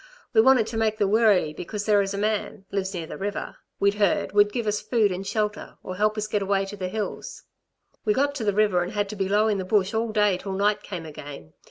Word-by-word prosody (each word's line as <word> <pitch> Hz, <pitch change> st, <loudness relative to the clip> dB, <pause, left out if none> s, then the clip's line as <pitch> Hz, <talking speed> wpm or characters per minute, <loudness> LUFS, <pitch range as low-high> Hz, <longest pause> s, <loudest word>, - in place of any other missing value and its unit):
We 220 Hz, -, +7 dB
wanted 255 Hz, -2 st, +5 dB
to 225 Hz, +1 st, -5 dB
make 220 Hz, -1 st, +1 dB
the 205 Hz, -, +2 dB
Wirree 205 Hz, -7 st, +3 dB
because 205 Hz, +6 st, -5 dB
there 210 Hz, -2 st, +4 dB
is 195 Hz, -1 st, -2 dB
a 200 Hz, -, -3 dB
man 210 Hz, -1 st, -2 dB
lives 195 Hz, -1 st, -2 dB
near 170 Hz, -2 st, -4 dB
the -, -, -8 dB
river 200 Hz, +1 st, -4 dB, 0.2 s
we'd 200 Hz, 0 st, +3 dB
heard 200 Hz, -4 st, +2 dB
would 205 Hz, +1 st, +4 dB
give 235 Hz, +1 st, -2 dB
us 210 Hz, 0 st, 0 dB
food 220 Hz, -5 st, +2 dB
and 190 Hz, +2 st, -4 dB
shelter, 210 Hz, 0 st, -3 dB
or 185 Hz, -, -6 dB
help 215 Hz, +2 st, +1 dB
us 215 Hz, -, -1 dB
to 215 Hz, -, -11 dB
get 210 Hz, -, +1 dB
away 195 Hz, 0 st, +1 dB
to 195 Hz, +1 st, -7 dB
the 185 Hz, -2 st, -4 dB
hills. 210 Hz, +3 st, -5 dB, 0.6 s
"We 215 Hz, -, +2 dB
got 285 Hz, +1 st, +1 dB
to 270 Hz, -5 st, -4 dB
the 205 Hz, -, +2 dB
river 205 Hz, -3 st, +2 dB
and 175 Hz, +4 st, -4 dB
had 205 Hz, -1 st, 0 dB
to 210 Hz, -, -5 dB
be 195 Hz, -1 st, -2 dB
low 210 Hz, +2 st, +3 dB
in 205 Hz, -2 st, +1 dB
the -, -, -2 dB
bush 195 Hz, +1 st, +1 dB
all 225 Hz, 0 st, 0 dB
day 210 Hz, -3 st, +2 dB
till 195 Hz, 0 st, -5 dB
night 205 Hz, +2 st, +1 dB
came 175 Hz, -5 st, -7 dB
again. 145 Hz, -, -10 dB
205 Hz, 260 wpm, -25 LUFS, 195-215 Hz, 0.6 s, We